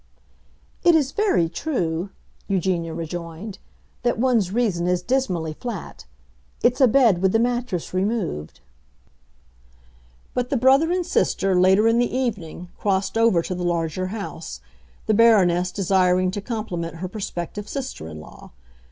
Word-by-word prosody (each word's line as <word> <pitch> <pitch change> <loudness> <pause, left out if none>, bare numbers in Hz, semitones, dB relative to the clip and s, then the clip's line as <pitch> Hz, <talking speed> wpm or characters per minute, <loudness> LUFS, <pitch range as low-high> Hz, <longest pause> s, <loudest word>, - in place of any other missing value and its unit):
"It 345 -2 +6
is 285 -4 +2
very 400 - +2
true," 175 - -2 0.4
Eugenia 180 -3 0
rejoined, 170 +4 -6 0.4
"that 240 -1 0
one's 230 -6 +2
reason 200 -7 0
is 180 0 0
dismally 185 -12 -1
flat. 240 +9 -7 0.6
It's 250 +3 +3
a 260 - +8
bed 225 -7 +4
with 190 -1 +2
the - - +5
mattress 240 -7 -1
removed." 185 - -2 1.7
But 250 0 -1
the 275 - +1
brother 270 +7 +4
and 360 -1 0
sister, 195 -10 +1
later 190 +4 +4
in 230 +1 +3
the 245 - +1
evening, 195 -9 -3
crossed 195 0 0
over 225 -7 +3
to 185 - -4
the 180 0 -4
larger 170 +1 -1
house, 205 +1 -6 0.5
the 220 - +2
Baroness 185 -6 +4
desiring 185 -1 +2
to 205 - -4
compliment 185 -7 -4
her 180 +3 -5
prospective 195 0 -5
sister 265 - -5
in 80 -1 -8
law. 75 - -14
195 Hz, 140 wpm, -23 LUFS, 175-240 Hz, 1.7 s, a